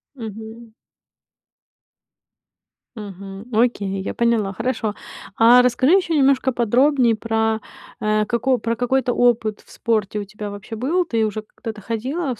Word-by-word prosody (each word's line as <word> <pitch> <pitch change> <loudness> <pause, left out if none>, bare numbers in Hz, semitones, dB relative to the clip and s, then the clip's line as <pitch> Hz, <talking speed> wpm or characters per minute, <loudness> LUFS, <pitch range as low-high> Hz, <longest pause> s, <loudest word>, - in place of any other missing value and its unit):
Мгм. 225 0 -9 2.2
Мгм, 195 0 -9
окей, 210 -4 0
я - - -4
поняла, 230 -4 +1
хорошо. 220 -1 -2 0.4
А 240 +2 +7
расскажи 255 +6 +3
ещё 355 -3 -1
немножко 270 -2 +3
подробнее 245 +1 +3
про, 220 0 0 0.4
э, 215 0 +1
како 240 +4 +1
про 230 +1 -2
какой-то 250 +1 +1
опыт 230 -4 +2
в - - -24
спорте 215 -3 -1
у 205 - -3
тебя 210 +1 -7
вообще 205 +2 -8
был? 325 +10 +1
Ты 230 -7 0
уже 215 0 -3
когда-то 215 0 -9
ходила 255 - -3
в 225 - -13
230 Hz, 135 wpm, -21 LUFS, 215-250 Hz, 2.2 s, А